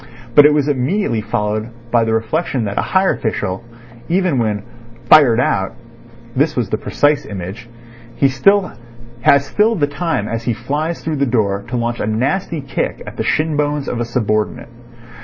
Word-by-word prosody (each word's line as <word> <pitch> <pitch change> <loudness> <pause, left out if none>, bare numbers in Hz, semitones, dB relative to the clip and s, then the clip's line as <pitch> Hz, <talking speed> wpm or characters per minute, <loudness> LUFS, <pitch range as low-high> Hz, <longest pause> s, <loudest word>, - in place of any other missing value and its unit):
But 145 +4 +8
it 150 - +3
was 145 -1 +1
immediately 140 - 0
followed 110 +1 -2 0.2
by 115 -2 +3
the 110 - 0
reflection 130 +3 -1
that 100 0 -2
a - - +3
higher 190 0 +2
official, 100 -3 -3 0.5
even 175 -6 +1
when 105 -3 -1 0.4
"fired 125 -4 +7
out" 95 -4 0 0.6
(this 150 +4 +1
was 120 -6 -1
the 110 - +1
precise 145 0 +1
image), 100 +4 -7 0.5
has 135 -1 +3
still 135 - +1
the 145 -7 +1
time 145 -7 -2
as 115 0 -3
he 120 - +1
flies 150 +8 -3
through 155 -2 -2
the 140 0 +1
door 100 -4 0
to 125 +1 -3
launch 120 0 -2
a - - -2
nasty 140 - -1
kick 135 - -3
at - - -9
the - - -1
shin 155 0 0
bones 145 -1 -1
of 120 - -3
a 120 - -1
subordinate. 110 -2 -1
125 Hz, 170 wpm, -17 LUFS, 110-150 Hz, 0.6 s, But